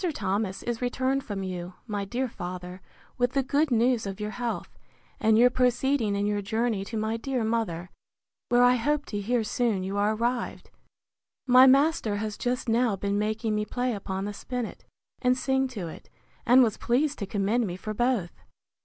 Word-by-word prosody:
Thomas 195 Hz, 0 st, -2 dB
is 240 Hz, 0 st, -3 dB
returned 260 Hz, +2 st, 0 dB
from 200 Hz, -5 st, -4 dB
you, 180 Hz, -1 st, -5 dB
my 205 Hz, -3 st, -3 dB
dear 250 Hz, +6 st, -2 dB
father, 180 Hz, -3 st, -7 dB, 0.4 s
with 245 Hz, 0 st, +2 dB
the 275 Hz, -, +2 dB
good 290 Hz, +3 st, +1 dB
news 240 Hz, -2 st, +2 dB
of 195 Hz, 0 st, -6 dB
your 210 Hz, 0 st, -3 dB
health, 240 Hz, 0 st, -4 dB, 0.4 s
and 220 Hz, 0 st, +4 dB
your 245 Hz, +2 st, +6 dB
proceeding 250 Hz, -3 st, +1 dB
in 200 Hz, 0 st, 0 dB
your 205 Hz, 0 st, 0 dB
journey 220 Hz, 0 st, -1 dB
to 225 Hz, +2 st, -5 dB
my 220 Hz, +1 st, -1 dB
dear 255 Hz, 0 st, -2 dB
mother, 210 Hz, -6 st, -2 dB, 0.6 s
where 245 Hz, 0 st, +5 dB
I 250 Hz, 0 st, +5 dB
hope 295 Hz, +4 st, 0 dB
to 205 Hz, -1 st, -4 dB
hear 235 Hz, +3 st, +1 dB
soon 215 Hz, -3 st, 0 dB
you 195 Hz, +2 st, -3 dB
are 210 Hz, +2 st, +2 dB
arrived. 240 Hz, +2 st, -2 dB, 0.7 s
My 255 Hz, 0 st, +8 dB
master 275 Hz, -5 st, +3 dB
has 210 Hz, 0 st, -3 dB
just 250 Hz, +3 st, -2 dB
now 230 Hz, -1 st, +2 dB
been 200 Hz, +1 st, -1 dB
making 215 Hz, +1 st, -1 dB
me 210 Hz, 0 st, 0 dB
play 245 Hz, +3 st, -2 dB
upon 195 Hz, -1 st, -4 dB
the 205 Hz, -, -4 dB
spinnet, 245 Hz, +2 st, -5 dB, 0.4 s
and 250 Hz, 0 st, +3 dB
sing 265 Hz, 0 st, +1 dB
to 210 Hz, -9 st, -6 dB
it; 160 Hz, -, -11 dB, 0.4 s
and 250 Hz, +2 st, +7 dB
was 220 Hz, -4 st, 0 dB
pleased 280 Hz, +4 st, 0 dB
to 200 Hz, -, -3 dB
commend 210 Hz, +4 st, 0 dB
me 175 Hz, -, -4 dB
for 215 Hz, +3 st, -5 dB
both. 240 Hz, -6 st, 0 dB
225 Hz, 185 wpm, -27 LUFS, 205-250 Hz, 0.7 s, My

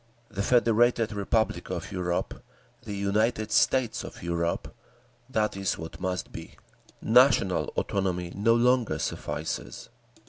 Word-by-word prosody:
The 100 Hz, -2 st, -3 dB
Federated 115 Hz, 0 st, +3 dB
Republic 100 Hz, -3 st, -1 dB
of 90 Hz, +3 st, -5 dB
Europe—the 90 Hz, +2 st, -5 dB
United 105 Hz, +2 st, 0 dB
States 115 Hz, 0 st, +2 dB
of -, -, -10 dB
Europe—that 110 Hz, +7 st, -4 dB
is 95 Hz, -1 st, -1 dB
what 80 Hz, 0 st, -8 dB
must 90 Hz, -1 st, -3 dB
be. -, -, -10 dB, 0.5 s
National 120 Hz, -6 st, +4 dB
autonomy 90 Hz, -3 st, -1 dB
no 115 Hz, +3 st, +3 dB
longer 125 Hz, 0 st, +2 dB
suffices. 75 Hz, -5 st, -4 dB
105 Hz, 105 wpm, -27 LUFS, 90-115 Hz, 0.5 s, National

